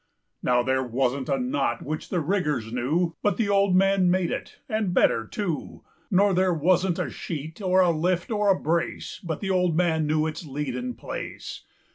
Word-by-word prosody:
Now 125 0 +2
there 130 +1 +1
wasn't 130 +2 -1
a - - +2
knot 260 +3 -1
which 155 +2 -5
the 175 - 0
riggers 150 - -1
knewBut 165 +9 0
the 220 -3 0
old 200 -2 +3
man 195 -1 +4
made 180 -1 +1
it—and 215 -5 -3
better 115 -1 +3
too; 175 - -4 0.3
Nor 200 +1 +4
there 185 0 +3
wasn't 175 +2 +2
a - - -2
sheet, 160 +3 -6
or 185 -1 +3
a 180 -2 +4
lift, 175 +4 0
or 210 -1 +2
a 190 - +4
brace, 170 +2 -2
But 160 -4 -4
the 195 -2 -1
old 180 -3 +2
man 160 -3 +2
knew 155 0 +2
its 160 +2 -4
lead 145 -3 -4
and 125 -1 -4
place. - - -7
175 Hz, 180 wpm, -25 LUFS, 150-190 Hz, 0.3 s, man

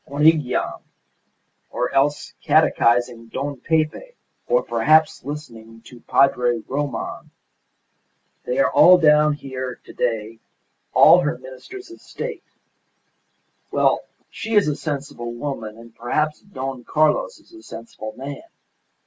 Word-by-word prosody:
Monygham 150 -2 +2 0.9
or 125 - -2
else 145 +2 +1
catechising 120 0 +2
Don 140 +1 -4
Pepe 160 - -1 0.3
or - - +2
perhaps 155 0 +3
listening 115 -6 -9
to 120 0 -14
Padre 125 -2 +2
Roman. 145 +1 -4 1.1
They 125 - -3
are 135 - +3
all 180 +1 +7
down 150 -2 +4
here 130 -3 -6
to - - -13
day 115 -1 -2 0.5
all 175 - +7
her 160 -2 -1
ministers 345 - -11
of 345 - -13
state. 475 -1 -6 1.3
Well, - - +2 0.3
she 220 0 -4
is 205 -4 +5
a 150 - 0
sensible 140 -6 -5
woman, 120 -5 -5
and 115 0 -14
perhaps 150 +6 -1
Don 135 -10 -6
Carlos 315 - +1
is - - -24
a 335 - -13
sensible 115 - -9
man. 140 +2 -7
140 Hz, 120 wpm, -22 LUFS, 120-155 Hz, 1.3 s, all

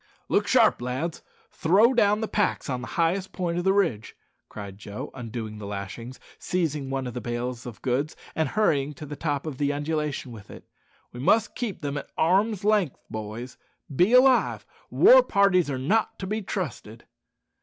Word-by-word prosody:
"Look - - +2
sharp, - - +4
lads! 130 +7 -3 0.3
throw 205 +10 +4
down 210 -3 +3
the 220 - -1
packs 205 -9 0
on 125 -1 -2
the 125 - -6
highest 180 +3 0
point 175 -1 -2
of - - -2
the 190 - +3
ridge," 170 - 0 0.3
cried 100 -2 -9
Joe, 105 0 -7
undoing 115 -3 -6
the 100 - -7
lashings, 105 +5 -7 0.2
seizing 150 -6 -2
one 135 -1 -2
of 125 - -5
the 125 - -5
bales 120 +2 -4
of 120 - -10
goods, 135 +4 -1 0.2
and 160 - 0
hurrying 150 -9 +1
to 150 - -8
the 145 0 -7
top 145 -1 -2
of 150 -4 -6
the 145 -1 +1
undulation 145 -2 -3
with 105 -3 -12
it; - - -12 0.4
"we 120 - -9
must 195 - +2
keep 235 -6 -4
them 145 0 -2
at - - -11
arm's 200 +5 +2
length, 205 -8 +2
boys 110 +3 -6 0.4
be 180 - +4
alive! 255 0 +4 0.2
War - - +7
parties 195 - +3
are 135 - -2
not 205 +13 0
to 190 - -5
be 215 +3 -2
trusted." 130 - -5
150 Hz, 180 wpm, -26 LUFS, 125-195 Hz, 0.4 s, War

